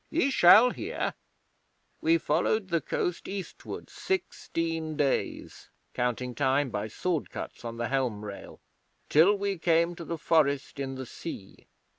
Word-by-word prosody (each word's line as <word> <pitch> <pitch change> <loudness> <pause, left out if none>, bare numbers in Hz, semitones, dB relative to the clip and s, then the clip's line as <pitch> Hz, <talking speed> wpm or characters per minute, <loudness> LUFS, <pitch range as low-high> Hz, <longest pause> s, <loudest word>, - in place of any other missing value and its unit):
Ye 315 -3 +1
shall 225 +5 +7
hear. - - -3 0.9
We 165 +1 +4
followed 200 +3 0
the 170 -2 +1
coast 175 +5 -2
eastward 195 -2 -6
sixteen 165 - -3
days 140 -3 -1 0.2
(counting 125 +1 -1
time 135 0 +1
by 105 0 -2
sword 165 - -2
cuts - - -7
on 115 -1 -5
the 120 - -2
helm 125 -6 -1
rail) 100 -1 -9 0.5
till 170 +7 +6
we 200 -2 -2
came 170 +1 +3
to 170 - -6
the 165 0 -4
Forest 145 -3 +1
in 135 -1 -3
the 130 0 -6
Sea. 115 - -9
160 Hz, 140 wpm, -28 LUFS, 130-175 Hz, 0.9 s, shall